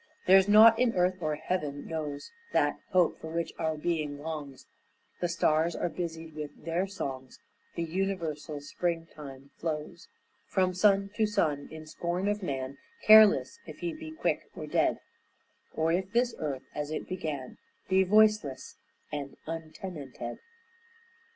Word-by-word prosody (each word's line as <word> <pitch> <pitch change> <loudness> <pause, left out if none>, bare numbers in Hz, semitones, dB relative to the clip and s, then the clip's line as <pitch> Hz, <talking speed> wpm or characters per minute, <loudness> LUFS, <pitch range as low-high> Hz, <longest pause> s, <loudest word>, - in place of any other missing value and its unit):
There's 190 +1 +7
nought 220 +2 +8
in 245 -2 +2
earth 180 0 +1
or 155 -2 0
heaven 150 -3 -3
knows 150 - -5 0.2
That 145 0 +2
hope 180 -4 +2
for - - -6
which 170 0 -2
our 160 -1 0
being 150 -3 -1
longs, 145 -3 -6 0.5
The 175 - 0
stars 165 0 +2
are 175 - -1
busied 165 -2 -5
with 150 -1 -8
their 170 +3 0
songs, 135 -9 -6 0.4
The 170 - -1
universal 165 -4 -3
springtime 145 -3 -5
flows 160 +2 -4 0.4
From 185 -1 +1
sun 195 +1 +3
to 220 - +3
sun 155 -9 0
in 160 0 -9
scorn 175 +4 -2
of 205 0 0
man, 135 -5 -4 0.3
Careless 215 -1 +7
if - - -9
he 340 -1 -2
be 315 0 -8
quick 315 +1 -2
or - - -6
dead, - - +2 0.8
Or 160 +1 +1
if 185 +2 0
this 240 0 +2
earth, 140 -4 -3
as 150 0 -3
it 155 - -4
began, 155 -8 -5 0.3
Be 190 0 +4
voiceless 210 -7 +3 0.3
and 145 -2 -5
untenanted. 155 -6 -6
165 Hz, 145 wpm, -29 LUFS, 150-190 Hz, 0.8 s, nought